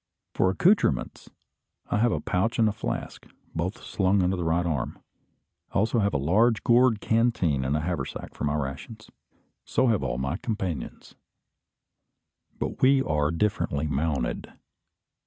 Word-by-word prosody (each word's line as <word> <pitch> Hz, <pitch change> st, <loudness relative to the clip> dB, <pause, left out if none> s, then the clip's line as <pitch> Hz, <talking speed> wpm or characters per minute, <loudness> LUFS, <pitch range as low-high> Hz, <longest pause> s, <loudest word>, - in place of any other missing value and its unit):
For 95 Hz, -, +2 dB
accoutrements 180 Hz, -, +1 dB, 0.6 s
I -, -, +2 dB
have 120 Hz, +1 st, +3 dB
a -, -, 0 dB
pouch 105 Hz, +6 st, -1 dB
and 115 Hz, -, +4 dB
a -, -, +2 dB
flask, 110 Hz, -, -5 dB, 0.3 s
both 85 Hz, +5 st, -3 dB
slung 95 Hz, 0 st, +1 dB
under 90 Hz, +2 st, +1 dB
the 90 Hz, -, -3 dB
right 85 Hz, +1 st, +1 dB
arm. 75 Hz, -7 st, -2 dB
I -, -, -32 dB
have 110 Hz, +3 st, +1 dB
also 120 Hz, -, +3 dB
a 100 Hz, -8 st, +1 dB
large 105 Hz, -, +2 dB
gourd 120 Hz, -2 st, +4 dB
canteen 110 Hz, -, +1 dB
and 65 Hz, +3 st, 0 dB
haversack 85 Hz, +3 st, -3 dB
for -, -, -4 dB
my 75 Hz, +1 st, 0 dB
rations. 75 Hz, -, -6 dB, 0.5 s
So 130 Hz, -1 st, +1 dB
have 110 Hz, -4 st, +2 dB
all -, -, -2 dB
my 65 Hz, +6 st, -2 dB
companions. 95 Hz, -, -5 dB, 1.4 s
But -, -, -4 dB
we 135 Hz, +1 st, +5 dB
are 75 Hz, -, +1 dB
differently 85 Hz, -4 st, -1 dB
mounted. 75 Hz, -3 st, -2 dB
95 Hz, 145 wpm, -26 LUFS, 75-110 Hz, 1.4 s, we